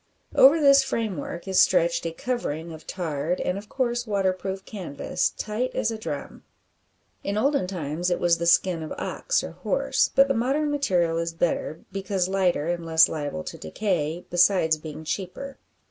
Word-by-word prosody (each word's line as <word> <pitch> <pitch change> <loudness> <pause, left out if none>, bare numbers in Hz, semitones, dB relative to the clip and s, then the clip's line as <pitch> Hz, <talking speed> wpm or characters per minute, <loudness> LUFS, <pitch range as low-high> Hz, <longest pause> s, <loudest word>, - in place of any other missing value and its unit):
Over 285 +5 +7
this 275 -2 +7
framework 200 - -4
is 190 -1 +2
stretched 170 -2 +3
a - - -3
covering 165 -6 -3
of 160 - -12
tarred, 165 -1 -2
and, 180 - -1
of 205 +1 -8
course, 240 -2 -1
waterproof 190 -1 -1
canvas, 180 -10 -2
tight 230 +4 -3
as 220 - 0
a 225 - -4
drum. 150 -8 -6 0.8
In 200 +1 -2
olden 275 -3 +1
times 175 -1 -3
it 175 - 0
was 170 -1 +2
the 170 - -1
skin 170 -1 +3
of 155 - -6
ox - - -1
or - - -6
horse, - - 0
but 275 0 +6
the 275 - +1
modern 275 +6 0
material 180 - +1
is 165 0 -2
better, 165 -2 -1
because 195 -2 -1
lighter, 185 -5 +1
and 175 0 -2
less 160 0 +5
liable 145 - -4
to - - -8
decay, 170 - -2
besides 175 -3 +3
being 155 0 -8
cheaper. 195 - -5
185 Hz, 170 wpm, -25 LUFS, 165-220 Hz, 0.8 s, Over